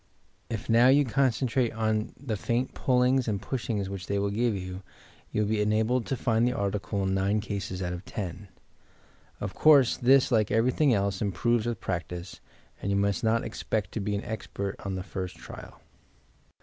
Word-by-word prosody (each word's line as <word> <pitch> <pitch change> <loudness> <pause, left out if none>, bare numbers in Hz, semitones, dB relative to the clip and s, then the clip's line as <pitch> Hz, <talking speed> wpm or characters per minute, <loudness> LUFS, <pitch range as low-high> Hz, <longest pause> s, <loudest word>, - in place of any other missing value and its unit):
If 110 - -4
now 115 +2 +5
you 140 +2 +5
concentrate 130 -1 +1
on 110 0 -1
the 125 -5 -3
faint 120 +5 -1
pulliags 125 0 +2
and 105 -3 0
pushings 115 -6 -3
which 95 -2 -6
they 100 - 0
will 100 0 0
give 115 +1 +1
you, 90 0 -6 0.5
you 105 - +1
will - - -1
be 110 -1 +1
enabled 110 +4 +1
to 135 - -1
find 115 0 +2
the 125 - +1
article 100 0 -1
in 95 0 0
nine 100 +2 +1
cases 100 -3 -4
out 90 0 -2
of 90 +1 -6
ten. 95 0 -6 0.9
Of 100 -2 -4
conree, 145 0 +6 0.2
this, 130 +2 +5
like 110 -3 +3
everything 130 +6 +3
else, 100 -3 0
improves 110 +4 +1
with 115 -4 -2
practice, 90 0 -5 0.4
and 100 - -2
you 100 - +2
miiat 100 +3 0
not 115 +1 +2
expect 105 -3 -3
to - - -3
be 105 0 -1
an 100 - -4
expert 100 -3 -4
on 95 -1 -3
the 95 - -4
first 95 -2 -5
trial. - - -11
110 Hz, 185 wpm, -28 LUFS, 100-120 Hz, 0.9 s, conree